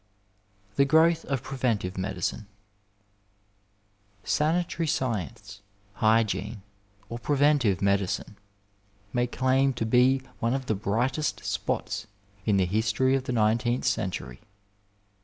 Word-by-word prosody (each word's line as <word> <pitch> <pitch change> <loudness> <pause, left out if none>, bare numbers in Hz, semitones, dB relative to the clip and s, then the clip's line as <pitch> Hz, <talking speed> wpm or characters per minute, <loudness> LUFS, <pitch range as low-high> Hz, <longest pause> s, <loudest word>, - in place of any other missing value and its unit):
THE 140 - +5
GROWTH 160 +3 +4
OF 135 -3 -2
PREVENTIVE 115 -9 -1
MEDICINE 95 +2 -3 1.8
Sanitary 165 +1 0
science, 105 - -3 0.3
hygiene, 105 -1 +1 0.4
or 120 +2 -6
preventive 140 - +2
medicine 100 +1 0 0.8
may 120 0 +1
claim 130 +2 +2
to 115 -2 -2
be 130 +3 +4 0.2
one 115 +2 +1
of 135 -1 -3
the 110 - 0
brightest 120 +9 -1
spots - - -2 0.4
in 105 -2 +3
the 95 - +3
history 110 +7 +1
of 135 -1 0
the - - -2
nineteenth 115 +2 +1
century. 80 - -2
120 Hz, 105 wpm, -27 LUFS, 105-135 Hz, 1.8 s, THE